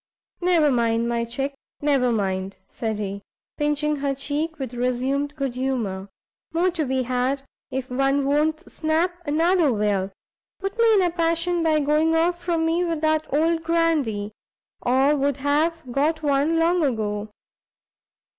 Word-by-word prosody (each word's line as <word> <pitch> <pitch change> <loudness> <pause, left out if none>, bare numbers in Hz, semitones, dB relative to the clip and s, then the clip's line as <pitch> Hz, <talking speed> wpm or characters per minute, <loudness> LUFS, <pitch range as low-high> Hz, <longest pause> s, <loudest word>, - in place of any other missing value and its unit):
"Never 340 -5 +3
mind, 230 -1 +1
my 235 0 0
chick, 270 +4 -3 0.3
never 275 -4 +2
mind," 190 -3 -1
said 220 -2 -3
he, 200 -1 -4 0.4
pinching 295 0 0
her 275 -1 -1
cheek, 300 +4 -2
with 260 -4 -5
resumed 260 +4 -1
good 275 -4 -2
humour, 230 -7 -2 0.4
"more 350 +3 +2
to 330 -3 -1
be 260 0 0
had; 255 +2 -1 0.3
if 260 -1 -3
one 275 +2 +1
won't 310 +4 +1
snap, 320 +3 0
another 325 +1 +3
will; 205 -3 0 0.5
put 390 +1 -4
me 460 -1 +5
in 390 - +4
a 350 - +1
passion 335 +1 0
by 315 -2 +3
going 305 +3 +2
off 345 +2 +1
from 335 -2 0
me 335 +2 +1
with 330 -3 -2
that 310 0 +1
old 325 +3 +2
grandee, 310 -11 0 0.5
or 265 +4 +3
would 280 -1 0
have 305 +4 +1
got 310 +5 0
one 290 +3 +2
long 340 +2 +3
ago. 215 -5 -1
285 Hz, 150 wpm, -23 LUFS, 250-325 Hz, 0.5 s, me